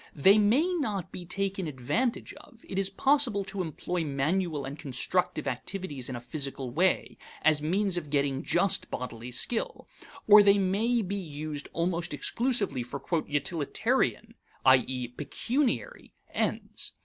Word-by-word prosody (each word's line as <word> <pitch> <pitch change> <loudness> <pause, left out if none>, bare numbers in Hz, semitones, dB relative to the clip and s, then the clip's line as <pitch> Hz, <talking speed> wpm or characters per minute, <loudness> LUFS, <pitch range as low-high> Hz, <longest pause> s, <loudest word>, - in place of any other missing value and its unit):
They 195 +9 +6
may 265 - +3
not 215 - -2
be 175 -2 -8
taken 195 -1 -2
advantage 150 - -2
of; 235 - -16
it 190 - -2
is 195 -1 0
possible 250 -1 +2
to 190 0 -4
employ 175 +1 -3
manual 150 +1 -1
and 140 +3 -7
constructive 155 +4 -1
activities 140 0 -4
in 130 - -4
a - - -4
physical 135 0 -4
way, 180 +7 +1 0.2
as 155 -2 +4
means 185 +4 +1
of 155 -4 -4
getting 140 -1 +1
just 195 +3 +1
bodily 120 -1 -5
skill; 225 - 0 0.4
or 210 0 +10
they 200 0 +5
may 215 +5 +1
be 200 +2 -3
used 150 -2 -6
almost 170 -2 -1
exclusively 215 - 0
for 125 +4 -6 0.3
"utilitarian," 175 - 0 0.3
i.e., 130 -1 +4
pecuniary, 260 - -2 0.2
ends. - - -3
175 Hz, 135 wpm, -28 LUFS, 140-205 Hz, 0.4 s, or